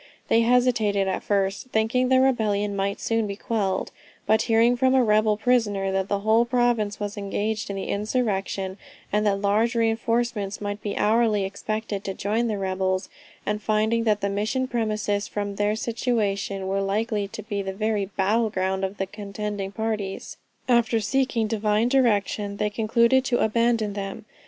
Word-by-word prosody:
They 230 - +4
hesitated 230 -5 +2
at 190 - -1
first, 200 +3 -1
thinking 250 +2 +1
the 260 0 +5
rebellion 210 -6 +1
might 200 +1 -1
soon 225 -1 0
be 200 - -4
quelled; 200 -3 -2 0.3
but 220 0 +3
hearing 230 +1 +3
from 260 +1 +3
a 260 - +5
rebel 215 -1 +3
prisoner 210 -5 +1
that 190 0 0
the 200 0 -1
whole 220 +2 +4
province 240 -4 +1
was 205 0 -4
engaged 205 +2 -2
in 200 - -3
the 195 - -4
insurrection, 200 -3 -2 0.3
and 210 0 +2
that 200 -1 +1
large 215 +4 +2
reinforcements 230 -2 0
might 205 0 -4
be 205 - -4
hourly 215 -2 +2
expected 205 +1 -4
to 195 - -3
join 220 +4 0
the 215 -2 -1
rebels, 185 -1 -1 0.4
and 210 0 -1
finding 220 +2 +1
that 210 -2 +2
the 200 - 0
Mission 215 +6 -1
premises 215 -3 -1
from 205 -1 -3
their 205 +1 +1
situation, 210 -4 -1
were 195 +1 0
likely 205 +1 -1
to 215 +2 -8
be 205 -1 -3
the 195 -1 -4
very 210 0 -1
battleground 190 -1 0
of 190 +1 -3
the 195 - -1
contending 205 0 -5
parties, 215 -3 -4 0.3
after 235 -2 +3
seeking 240 0 0
Divine 215 +1 +1
direction, 210 -5 +1
they 210 0 -1
concluded 235 +4 +3
to 240 - +1
abandon 225 -1 +1
them. 200 +2 -6
210 Hz, 165 wpm, -24 LUFS, 200-230 Hz, 0.4 s, the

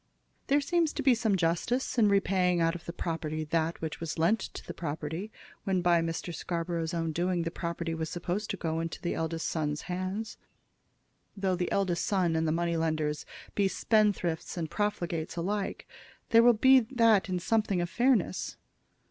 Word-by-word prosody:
There 285 +1 +3
seems 330 +1 +1
to - - -3
be 265 -1 +6
some 225 -3 +1
justice 185 +11 0
in 210 -2 +5
repaying 185 -3 +2
out 165 0 +2
of 175 -1 -8
the - - -4
property 160 -2 -3
that 160 +2 -1
which 160 -1 -4
was 165 0 -4
lent 170 +8 +3
to - - -7
the 170 - -6
property 160 +5 -4 0.3
when 185 -2 0
by 175 -1 +4
Mr. 165 +1 -3
Scarborough's 170 0 -3
own 165 -1 -1
doing 175 +2 0
the 165 - -3
property 170 -1 -3
was 160 -1 -3
supposed 180 +4 -3
to 195 - -2
go 160 -2 -2
into 165 0 -4
the 175 - -2
eldest 165 0 -2
son's 150 -2 -2
hands. 185 +5 -4 1.0
Though 190 -2 +1
the 180 0 -2
eldest 185 -4 +1
son 180 -5 +1
and 160 0 +1
the - - +2
money 170 +1 0
lenders 155 -2 -1 0.3
be 200 -1 +2
spendthrifts 200 -6 +1
and 165 -2 -3
profligates 175 -7 -2
alike, 195 +3 -2 0.4
there 230 - +7
will 240 -1 +6
in 260 -3 +7
that 225 -5 +4
be 185 -1 -1
something 200 +1 +1
of 175 - 0
fairness. 240 -3 +1
175 Hz, 180 wpm, -29 LUFS, 165-205 Hz, 1.0 s, there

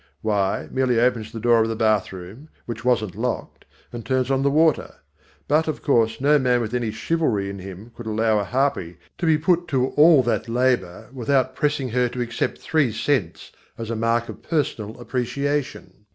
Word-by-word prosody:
Why, 100 -3 0
merely 130 -3 +1
opens 115 -3 +1
the 115 - -6
door 115 0 +4
of 110 - +1
the 115 - -2
bathroom, 110 - -2 0.2
which 115 -1 -6
wasn't 110 -6 +1
locked, - - -4 0.3
and 120 -1 -6
turns 130 +1 0
on 135 0 +2
the 140 - +2
water. 155 +2 +2 0.5
But, 155 +3 +2
of 155 - -3
course, 115 -5 +2
no 145 +2 +4
man 125 -2 +2
with 115 -1 -4
any 120 -2 -1
chivalry 110 -5 -1
in 100 - -8
him 95 +4 -10
could 120 - -9
allow 110 0 +1
a - - -1
harpy 125 - -1 0.2
to 170 - -1
be 160 -1 +4
put 175 +2 +1
to 130 -1 +1
all 150 -3 +6
that 120 0 -1
labour 120 -8 0
without 130 +1 +1
pressing 145 -4 -1
her 125 +1 +1
to 125 +1 -5
accept 120 -1 -2
three 155 -6 +1
cents 115 - -2 0.3
as 115 0 -5
a - - -1
mark 115 +1 0
of - - -9
personal 120 -10 -2
appreciation. 130 -3 -3
120 Hz, 185 wpm, -23 LUFS, 110-140 Hz, 0.5 s, all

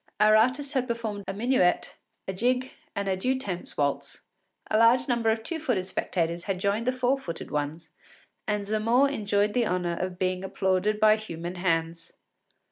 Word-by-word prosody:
Our 215 0 +6
artist 265 +6 +2
had 255 -2 0
performed 220 -4 -4
a 195 - -3
minuet, 225 -5 +1 0.3
a 190 - -2
jig, 250 +6 0 0.2
and 200 0 -2
a 190 - +1
deux 255 +8 0
temps 190 -9 -5
waltz. 140 -1 -2 0.5
A 215 - +4
large 240 +2 +5
number 235 -3 +1
of 220 0 0
two 325 +7 -2
footed 245 -12 -1
spectators 170 -2 -2
had 195 -3 -2
joined 200 +5 0
the - - +4
four 255 +1 +1
footed 170 -10 -7
ones, 150 +3 -3 0.6
and 210 -1 -1
Zamore 230 +6 +2
enjoyed 205 -4 0
the 240 -1 +2
honour 180 -1 -1
of 180 +1 -4
being 185 0 -1
applauded 190 +2 0
by 215 0 +5
human 175 -5 -6
hands. 165 -2 -2
205 Hz, 175 wpm, -27 LUFS, 180-235 Hz, 0.6 s, Our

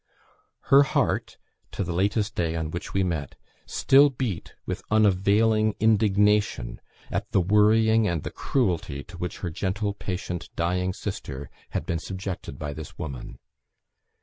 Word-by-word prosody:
Her 140 - +10
heart, 140 - 0 0.4
to - - -1
the 85 - -3
latest 105 +4 +1
day 85 -4 -1
on 80 -1 -3
which 85 +3 -5
we 95 - +1
met, 80 -6 -3 0.3
still 140 +2 +5
beat 120 -9 -4
with - - -3
unavailing 110 +1 +3
indignation 105 - +2 0.3
at - - -2
the - - +5
worrying 110 +3 +4
and 85 -5 -1
the - - -5
cruelty 85 - -1
to - - -12
which 90 0 -4
her 85 - -2
gentle, 100 +4 -2
patient, 90 -3 -5
dying 90 +2 0
sister 70 -9 -6 0.3
had - - -4
been 85 - -1
subjected 95 -6 -6
by 75 0 -4
this 75 +1 -9
woman. 70 -7 -6
95 Hz, 145 wpm, -26 LUFS, 85-105 Hz, 0.4 s, Her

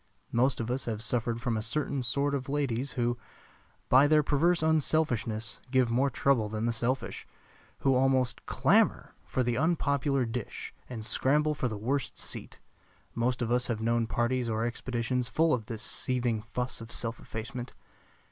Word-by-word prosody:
Most 125 +3 +2
of 115 +1 -2
us 130 +2 -1
have 110 -3 -2
suffered 115 0 0
from 120 0 -1
a 110 - -1
certain 140 +4 -1
sort 140 +4 0
of 135 -1 -2
ladies 135 -2 -1
who, 120 0 0 0.7
by 135 +3 +6
their 155 0 +5
perverse 160 +4 +2
unselfishness, 145 -8 +1
give 130 -2 +3
more 130 +4 +3
trouble 125 -4 +2
than 110 +1 -2
the 120 - +1
selfish; 125 +3 -2 0.5
who 135 - +3
almost 130 -2 +2
clamor - - +2
for 130 - 0
the 120 -1 0
unpopular 140 -4 +1
dish 115 -1 -5 0.2
and 115 -4 -5
scramble 150 +6 +2
for 135 - -1
the 110 -3 -4
worst 135 +7 -2
seat. - - -5 0.5
Most 120 +1 0
of 115 - -2
us 125 +1 +2
have 115 -3 -1
known 115 0 +1
parties 120 +1 0
or 110 +1 0
expeditions 120 +1 -2
full 165 -1 +3
of 115 -4 -2
this 115 -2 -4
seething 120 -4 -1
fuss 120 +2 -2
of 115 +1 -9
self 115 -1 -2
effacement. 120 +3 -6
125 Hz, 165 wpm, -29 LUFS, 115-135 Hz, 0.7 s, by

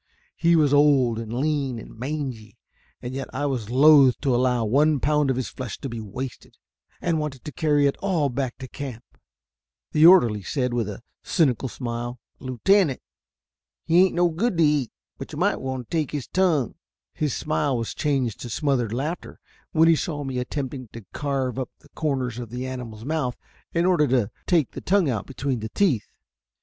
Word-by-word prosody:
He 170 0 +3
was 150 -3 +3
old 140 -6 +4
and 115 -1 -6
lean 135 0 -1
and 115 - -10
mangy, 125 -4 -5 0.5
and 125 +1 -5
yet 135 0 -4
I 145 +2 -1
was 125 -7 -2
loath 135 0 +6
to 135 -3 +1
allow 125 -1 +2
one 145 +6 +3
pound 150 0 +2
of 130 - +2
his 130 0 -2
flesh 125 -5 -6
to 135 - -6
be 115 -1 -5
wasted, 120 +5 -7 0.4
and 165 -2 0
wanted 145 -4 -5
to 150 - -5
carry 145 +1 +2
it 140 - +2
all 180 -7 +1
back 130 -1 -3
to 130 - -8
camp. 125 -3 -7 0.9
The 155 +2 +7
orderly 120 - +6
said, 125 +5 -2
with 115 -4 -1
a 105 +3 -8 0.2
cynical 135 -5 +1
smile, 120 0 -5 0.2
"Lieutenant, 140 - +2 0.9
he 170 +2 +5
ain't 190 - -2
no 175 0 +3
good 185 +4 -1
to 165 - +4
eat, 150 -5 +2 0.3
but - - -8
you - - -6
might - - +1 0.3
take 155 -4 0
his 145 -5 -4
tongue." 165 - +1 0.4
His 150 -4 -1
smile 150 -3 0
was 115 -1 -3
changed 135 -7 -1
to 120 - -7
smothered 125 -1 0
laughter 150 +8 -4 0.3
when 160 0 +4
he 165 - +6
saw 150 -3 -3
me 130 -2 -3
attempting 130 0 -4
to 115 -3 -9
carve 135 -3 -2
up 130 - -3
the - - -22
corners 130 -6 -2
of 120 -3 -6
the 125 +2 -5
animal's 120 -4 -7
mouth 145 -5 -1 0.4
in 170 0 +1
order 175 -5 +3
to 120 -4 +1 0.2
take 165 -7 +2
the - - -7
tongue 185 -6 +2
out 110 -5 -3
between 135 -2 -2
the 110 0 -5
teeth. 145 - +1
135 Hz, 185 wpm, -24 LUFS, 120-150 Hz, 0.9 s, The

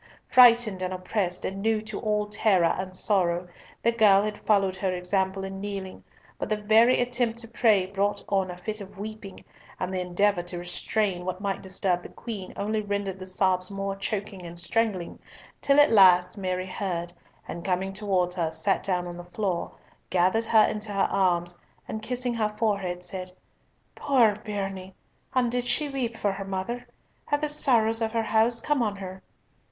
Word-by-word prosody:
Frightened 235 -6 +6
and 185 0 -2
oppressed, 185 0 -2
and 195 +1 -4
new 220 +1 +2
to 215 -2 -5
all 210 -1 0
terror 210 -4 +2
and 185 0 -5
sorrow, 180 -3 +2 0.4
the 235 - +4
girl 210 -4 +5
had 210 0 -3
followed 195 -3 +3
her 190 -1 -1
example 190 +1 -1
in 195 0 -6
kneeling, 195 -2 -6 0.4
but - - -3
the 215 - +1
very 220 +4 +5
attempt 245 -2 0
to 235 -1 -5
pray 215 -5 +3
brought 200 +2 -1
on 195 -2 0
a 180 - -7
fit 215 +4 -5
of 200 +1 -11
weeping, 210 -1 -8 0.3
and 185 +1 -3
the 185 - -1
endeavour 180 +1 +1
to 175 0 -4
restrain 180 +2 -1
what 185 0 -4
might 200 -1 -2
disturb 190 -1 -1
the - - -10
Queen 205 -6 -7
only 215 +2 -1
rendered 200 -2 -3
the 185 - -7
sobs 185 -1 +1
more 195 0 -3
choking 195 -1 -4
and 170 0 -8
strangling, 195 -1 -1 0.4
till 280 0 +4
at 290 - +6
last 180 -4 +6
Mary 185 -2 -2
heard, 180 -3 -3 0.3
and 170 - -6
coming 190 +1 -1
towards 190 -3 0
her, 165 -2 0
sat 195 +4 0
down 180 -2 -1
on 175 0 -7
the 175 - -8
floor, 180 -1 -2 0.4
gathered 185 +5 +2
her 220 -1 +5
into 215 0 -3
her 200 -1 +2
arms, 175 -3 +1 0.3
and 220 - -5
kissing 245 +2 -2
her 220 -2 0
forehead, 200 -5 -2
said, 185 -1 -6 0.6
"Poor 240 -7 +3
bairnie, 195 -3 -5 0.4
and 245 -2 +2
did 245 0 0
she 250 +5 +1
weep 245 -4 -3
for 205 -2 0
her 195 0 -5
mother? 195 +6 -4 0.4
Have 290 0 0
the 305 - +1
sorrows 230 -6 +3
of 220 -1 0
her 225 -1 +1
house 225 +2 +2
come 295 +2 0
on 210 -3 0
her?" 190 -1 -8
195 Hz, 180 wpm, -26 LUFS, 185-220 Hz, 0.6 s, Frightened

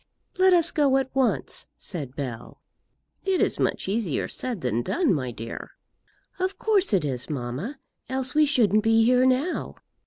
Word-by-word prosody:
"Let 375 0 +6
us 340 -2 +4
go 280 -4 +3
at 265 -1 -2
once," 265 -2 +1
said 145 -9 -6
Bell. 125 -6 -6 0.6
"It 385 -2 +1
is - - +1
much - - 0
easier 195 - -1
said 245 -8 -4
than 120 -3 0
done, 335 - +1
my 130 -6 -2
dear." 115 -1 -8 0.7
"Of 375 +1 -1
course 405 -3 +2
it 185 -7 +2
is, 130 -3 -3
mamma; 140 - -4 0.3
else 260 -1 -1
we 305 0 +4
shouldn't 215 -7 +3
be 225 0 +4
here 250 +1 +4
now. 265 +8 0
240 Hz, 160 wpm, -25 LUFS, -, 0.7 s, Let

